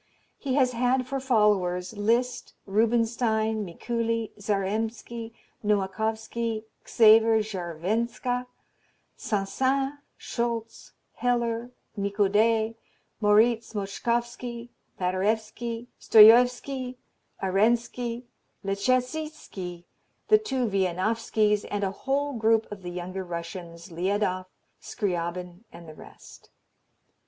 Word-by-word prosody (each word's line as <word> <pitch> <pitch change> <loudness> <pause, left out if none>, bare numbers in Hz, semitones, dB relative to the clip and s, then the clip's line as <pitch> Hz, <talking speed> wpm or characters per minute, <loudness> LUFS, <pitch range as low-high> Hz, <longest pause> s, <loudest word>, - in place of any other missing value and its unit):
He 265 -2 -1
has 260 -3 +3
had 250 +2 +1
for 270 +1 -3
followers 210 -7 +1
Liszt, 235 +4 0
Rubinstein, 220 0 +1
Mikuli, 230 +4 -2
Zarembski, 220 +3 -2 0.3
Nowakowski, 220 +2 -1 0.2
Xaver 220 0 +6
Scharwenka, 220 +7 -2 0.7
Saint 200 -3 -2
Saens, 270 +5 +1 0.3
Scholtz, 235 -1 -4 0.2
Heller, 235 -1 0 0.3
Nicode, 210 +2 +2 0.5
Moriz 220 +2 +3
Moszkowski, 235 +4 -3 0.3
Paderewski, 215 +5 -1
Stojowski, 250 +4 +6 0.5
Arenski, 235 +4 +1 0.4
Leschetizki, 225 - -2 0.5
the 430 0 +7
two 265 - -1
Wieniawskis, 210 +2 +1
and 205 0 -2
a 190 - 0
whole 280 +7 -1
group 225 -1 +2
of 205 -2 -7
the 180 - -6
younger 180 +2 -5
Russians 170 0 -7
Liadoff, 185 +1 -1 0.3
Scriabine 180 -2 -3
and 170 - -12
the 155 - -9
rest. - - -15
220 Hz, 85 wpm, -27 LUFS, 195-240 Hz, 0.7 s, the